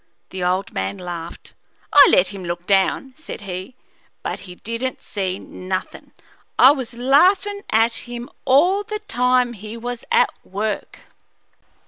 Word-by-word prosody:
The 185 Hz, -1 st, -4 dB
old 185 Hz, +2 st, 0 dB
man 95 Hz, +1 st, -2 dB
laughed. 175 Hz, -2 st, -8 dB, 0.4 s
"I 290 Hz, -1 st, +9 dB
let 180 Hz, -, +4 dB
him 195 Hz, -2 st, -8 dB
look 175 Hz, 0 st, -4 dB
down," 200 Hz, +7 st, +1 dB
said 310 Hz, -7 st, -9 dB
he, 190 Hz, +4 st, -6 dB, 0.5 s
"but -, -, -3 dB
he 180 Hz, -, -9 dB
didn't 230 Hz, +6 st, -4 dB
see 190 Hz, -2 st, -3 dB
nothin'. 185 Hz, 0 st, -6 dB, 0.5 s
I 260 Hz, -, +9 dB
was 260 Hz, -5 st, -4 dB
laughin' 370 Hz, +11 st, +3 dB
at 225 Hz, +1 st, +3 dB, 0.2 s
him 240 Hz, 0 st, -6 dB, 0.2 s
all 350 Hz, +10 st, +4 dB
the 425 Hz, +1 st, -4 dB
time 250 Hz, -6 st, +2 dB
he 215 Hz, +1 st, -8 dB
was 240 Hz, +1 st, -5 dB
at 475 Hz, +1 st, +4 dB
work. 210 Hz, +2 st, -4 dB
230 Hz, 140 wpm, -21 LUFS, 185-265 Hz, 0.5 s, I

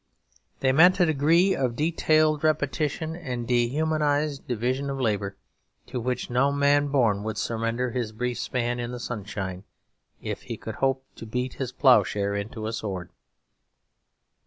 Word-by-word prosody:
They 130 Hz, -, +3 dB
meant 180 Hz, +7 st, +6 dB
a 180 Hz, -, +6 dB
degree 165 Hz, +5 st, +3 dB
of 125 Hz, -3 st, -1 dB
detailed 155 Hz, 0 st, +2 dB
repetition 155 Hz, +1 st, 0 dB
and 125 Hz, -8 st, -5 dB
dehumanised 145 Hz, +3 st, +1 dB
division 125 Hz, +4 st, -1 dB
of 135 Hz, 0 st, -3 dB
labour, 100 Hz, -5 st, -1 dB, 0.5 s
to 125 Hz, -, -4 dB
which 125 Hz, +1 st, -2 dB
no 125 Hz, +3 st, +2 dB
man 145 Hz, 0 st, +3 dB
born 120 Hz, -8 st, +2 dB
would 110 Hz, 0 st, -4 dB
surrender 115 Hz, +2 st, -1 dB
his 120 Hz, -3 st, -2 dB
brief 120 Hz, +1 st, -3 dB
span 120 Hz, -1 st, -1 dB
in 120 Hz, 0 st, -3 dB
the 125 Hz, -, -6 dB
sunshine, 100 Hz, -5 st, -5 dB, 0.6 s
if -, -, -5 dB
he -, -, -6 dB
could -, -, -7 dB
hope 135 Hz, 0 st, +1 dB
to 115 Hz, -, -8 dB
beat 125 Hz, +3 st, -2 dB
his 130 Hz, -2 st, -4 dB
ploughshare 105 Hz, -6 st, +3 dB
into 110 Hz, +2 st, -4 dB
a 110 Hz, -, -3 dB
sword. 95 Hz, -5 st, -4 dB
125 Hz, 150 wpm, -26 LUFS, 115-145 Hz, 0.6 s, meant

